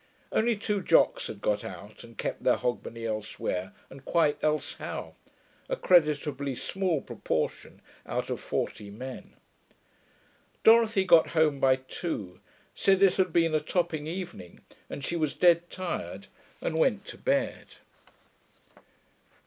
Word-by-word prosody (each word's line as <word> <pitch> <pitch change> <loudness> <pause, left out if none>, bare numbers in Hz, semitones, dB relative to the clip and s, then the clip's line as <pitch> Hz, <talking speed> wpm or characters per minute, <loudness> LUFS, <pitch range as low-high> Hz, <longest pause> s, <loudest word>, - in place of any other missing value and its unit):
(Only 235 +1 +2
two 205 -1 -1
Jocks 165 - +3
had 100 - -8
got 105 -1 0
out 100 +4 -9
and 115 -2 -14
kept - - -3
their - - +4
Hogmanay 115 -1 -3
elsewhere 105 -4 -3 0.2
and 135 0 -13
quite 160 -2 +1
elsehow 155 0 -2 0.6
a - - 0
creditably 150 - +2
small 185 0 -1
proportion - - -3 0.2
out - - -2
of - - -2
forty 100 - -3
men.) 125 +6 -9 1.3
Dorothy 225 -3 +6
got 170 -3 +6
home 150 -3 +3
by 130 -1 +5
two, 130 - -5 0.3
said 195 0 +3
it 190 -2 +5
had 185 -3 +2
been 165 -1 +3
a 155 - +3
topping 160 -1 -1
evening 170 - -7 0.3
and 140 - -5
she 170 - -2
was 155 -4 -1
dead 175 -1 +4
tired, 100 - -5 0.4
and 160 - -1
went 205 +1 +2
to - - -10
bed. 275 0 -1
155 Hz, 135 wpm, -28 LUFS, 125-185 Hz, 1.3 s, Dorothy